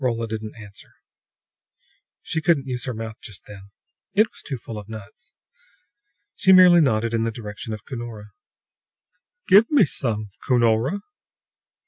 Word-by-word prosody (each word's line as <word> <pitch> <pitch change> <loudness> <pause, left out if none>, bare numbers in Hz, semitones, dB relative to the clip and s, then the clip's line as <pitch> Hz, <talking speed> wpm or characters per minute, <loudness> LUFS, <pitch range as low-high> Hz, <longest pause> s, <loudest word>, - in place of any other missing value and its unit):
Rolla 115 -2 -1
didn't 110 -1 -6
answer; 105 -2 -13 1.3
she 160 - -2
couldn't 160 -4 +2
use 125 -2 -4
her 125 - -3
mouth 110 0 -6
just 105 -4 -9
then; 100 -1 -12 0.5
it 215 +2 +5
was - - -12
too 135 - -5
full 115 -2 -8
of 105 +1 -12
nuts. 110 - -11 1.0
She 190 - +3
merely 180 -2 +8
nodded 115 -5 +1
in 115 - +1
the 115 - 0
direction 110 -1 -7
of 105 0 -7
Cunora. 115 -5 -8 1.2
"Give 205 +4 +6
me 285 -9 +5
some, 110 -7 -2
Cunora!" 120 - +2
115 Hz, 140 wpm, -23 LUFS, 110-140 Hz, 1.3 s, merely